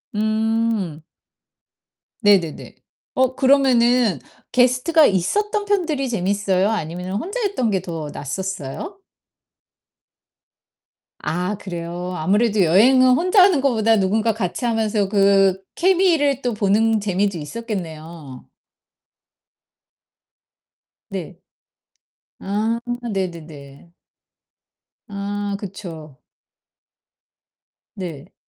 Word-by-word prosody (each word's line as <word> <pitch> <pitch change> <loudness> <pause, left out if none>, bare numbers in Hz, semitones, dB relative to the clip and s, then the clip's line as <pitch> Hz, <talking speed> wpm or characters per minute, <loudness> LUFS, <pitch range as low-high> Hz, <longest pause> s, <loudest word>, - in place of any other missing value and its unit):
음. 220 -6 -1 1.2
네네네. 195 -7 +1 0.4
어 260 0 +1
그러면은 250 -5 +3 0.3
게스트가 255 +6 +4
있었던 415 - 0
편들이 325 -10 0
재밌어요, 200 -2 0
아니면은 180 -2 -4
혼자 380 - -4
했던 380 - 0
게 190 -2 0
더 160 -4 -6
낫었어요? 190 - -5 2.2
아, 180 +5 -2
그래요. 175 -1 -6
아무래도 205 +5 +2
여행은 255 +10 +5
혼자 365 +5 +4
하는 365 -7 +4
거보다 225 -4 +2
누군가 215 +3 +1
같이 220 +3 -3
하면서 220 -3 0
그 195 -1 +3
케미를 340 -7 +2
또 245 -2 -1
보는 215 +2 +2
재미도 200 -1 -1
있었겠네요. 160 - -7 2.6
네. - - -6 1.0
아 215 +4 -1 0.3
네네네. 165 -5 -7 1.1
아 205 0 -4
그쵸. 165 -8 -9 1.8
네. 165 -7 -8
205 Hz, 185 characters per minute, -21 LUFS, 180-245 Hz, 2.6 s, 여행은